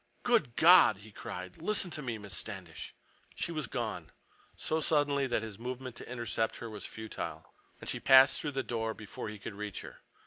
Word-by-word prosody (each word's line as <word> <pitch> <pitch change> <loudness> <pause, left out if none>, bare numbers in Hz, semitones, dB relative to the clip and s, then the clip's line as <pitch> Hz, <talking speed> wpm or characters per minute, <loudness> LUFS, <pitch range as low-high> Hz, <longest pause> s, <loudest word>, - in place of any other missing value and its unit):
"Good 220 - +2
God!" 165 - +8
he 105 +2 -14
cried. 90 -2 -7
"Listen 190 0 +1
to 150 - -4
me—Miss 110 -7 -4
Standish—" 90 -4 -6 0.4
She - - -2
was 155 -6 -2
gone, - - -4 0.5
so 160 - 0
suddenly 145 -3 +2
that 120 -3 0
his 110 -2 -7
movement 125 +1 -5
to - - -8
intercept 115 -2 -1
her 115 -2 -7
was 105 -3 -6
futile, 85 -8 -6 0.3
and - - -10
she - - -2
passed 135 0 +7
through 150 -2 -3
the 135 0 -1
door 115 -1 -2
before 105 0 -7
he 105 - -7
could 100 +1 -7
reach 105 -1 -5
her. - - -11
115 Hz, 185 wpm, -32 LUFS, 105-140 Hz, 0.5 s, God